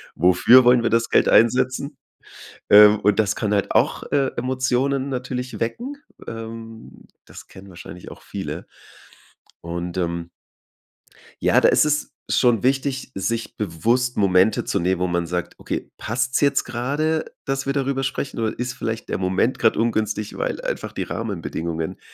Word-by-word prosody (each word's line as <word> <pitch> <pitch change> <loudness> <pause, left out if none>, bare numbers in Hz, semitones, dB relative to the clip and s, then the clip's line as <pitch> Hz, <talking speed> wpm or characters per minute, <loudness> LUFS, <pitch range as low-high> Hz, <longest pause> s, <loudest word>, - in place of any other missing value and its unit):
Wofür 95 +9 +6
wollen 125 -1 +6
wir 115 - +1
das 115 0 +1
Geld - - +3
einsetzen?" 130 +4 +2 0.7
Ähm, 105 0 +8
und 105 0 +2
das 105 -1 +2
kann 105 -1 -1
halt 100 -2 0
auch, - - +2
äh, 140 -2 +2
Emotionen 130 +2 0
natürlich 125 -1 -4
wecken. 240 - -3 0.3
Ähm, 115 0 -9 0.2
das - - -13
kennen 95 +1 -14
wahrscheinlich 85 -1 -11
auch - - -13
viele. - - -6 1.0
Und, 85 +1 -5
ähm 85 -1 -2 1.1
ja, - - +4
da - - +5
ist - - +4
es 150 0 -1 0.2
schon 120 -5 +3
wichtig, 135 0 0
sich 115 +4 -3
bewusst 115 +7 0
Momente 95 +1 +3
zu 100 - -1
nehmen, 90 +1 0
wo 90 - +1
man 85 -1 -1
sagt: 90 +1 -3
„Okay, - - -5
passt's 125 +4 -1
jetzt 140 -1 +3
grade, 145 +6 -1 0.2
dass 135 0 -2
wir 135 - -1
darüber 135 -1 -1
sprechen, 135 -1 -3
oder 110 -1 -2
ist 125 0 -3
vielleicht 115 -3 -5
der - - -1
Moment 95 +6 0
gerade - - +3
ungünstig, 110 -2 -1
weil - - -2
einfach - - -4
die - - -3
Rahmenbedingungen 80 -1 -4
115 Hz, 155 wpm, -22 LUFS, 95-130 Hz, 1.1 s, Ähm